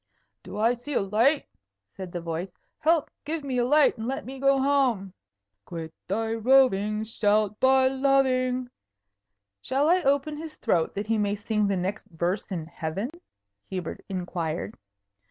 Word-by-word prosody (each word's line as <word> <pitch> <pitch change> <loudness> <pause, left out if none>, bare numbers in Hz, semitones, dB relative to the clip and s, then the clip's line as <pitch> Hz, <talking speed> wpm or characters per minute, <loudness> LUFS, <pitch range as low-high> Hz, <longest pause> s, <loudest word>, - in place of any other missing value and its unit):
"Do - - -8
I 225 +3 +3
see 245 +5 -7
a - - +4
light?" 225 +9 +2 0.5
said 185 -2 -7
the 175 - -4
voice. 170 +2 -4 0.3
"Help! 320 -1 +2
Give 310 +1 -3
me 260 -3 -1
a - - +3
light, 295 -1 +4
and 220 - -3
let 270 +1 -3
me 265 +1 -7
go 275 0 +4
home. 260 -9 +1 0.5
"Quit 160 +4 -7
thy 225 +3 -1
roving; 220 -3 +3
Shalt 215 -1 +1
by 260 0 +5
loving 260 -2 +1 0.4
" 100 -1 -58
"Shall 275 +3 +1
I 360 +2 +4
open 285 +1 +1
his 315 0 -8
throat, 170 -8 0
that 205 +1 -2
he 220 0 +1
may 205 0 +1
sing 210 0 0
the 195 -1 0
next 195 +4 -3
verse 175 +2 -2
in 170 -4 -3
heaven?" 165 - -4 0.6
Hubert 180 -3 -5
inquired. 175 -3 -3
220 Hz, 160 wpm, -26 LUFS, 190-270 Hz, 0.6 s, by